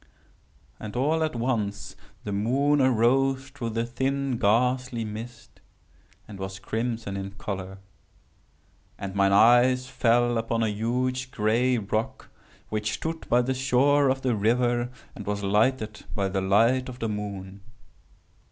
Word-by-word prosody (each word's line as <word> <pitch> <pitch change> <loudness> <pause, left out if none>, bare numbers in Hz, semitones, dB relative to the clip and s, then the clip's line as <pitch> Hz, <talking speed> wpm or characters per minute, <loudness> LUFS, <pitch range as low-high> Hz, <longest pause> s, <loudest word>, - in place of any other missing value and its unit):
"And, 105 -2 -7
all 155 +6 +1
at 155 -4 -2
once, 115 -4 -2 0.3
the 105 - -4
moon 135 +8 +2
arose 130 +2 +2
through 130 -4 -5
the 115 +1 -1
thin 135 +1 -2
ghastly 125 +2 +1
mist, 110 +3 -9 0.7
and 100 -2 -10
was 95 0 -5
crimson 110 0 -3
in 100 0 -5
color. 95 -1 -6 1.2
And 100 -1 -6
mine 100 0 +3
eyes 120 +5 +5
fell 120 -2 +2
upon 115 0 -1
a 110 - +1
huge 125 +4 -1
gray 120 +2 +1
rock 110 +1 -3 0.4
which 105 0 -2
stood 160 0 -5
by 120 +1 +4
the 130 +2 0
shore 135 +2 +3
of 130 0 -1
the 125 -3 +1
river, 120 +3 +1 0.3
and 105 - -9
was 105 0 -2
lighted 105 +2 +1
by 100 -1 0
the 95 0 -1
light 115 +7 +3
of 125 - -8
the 115 - -2
moon. 100 -2 -6
115 Hz, 140 wpm, -26 LUFS, 105-130 Hz, 1.2 s, eyes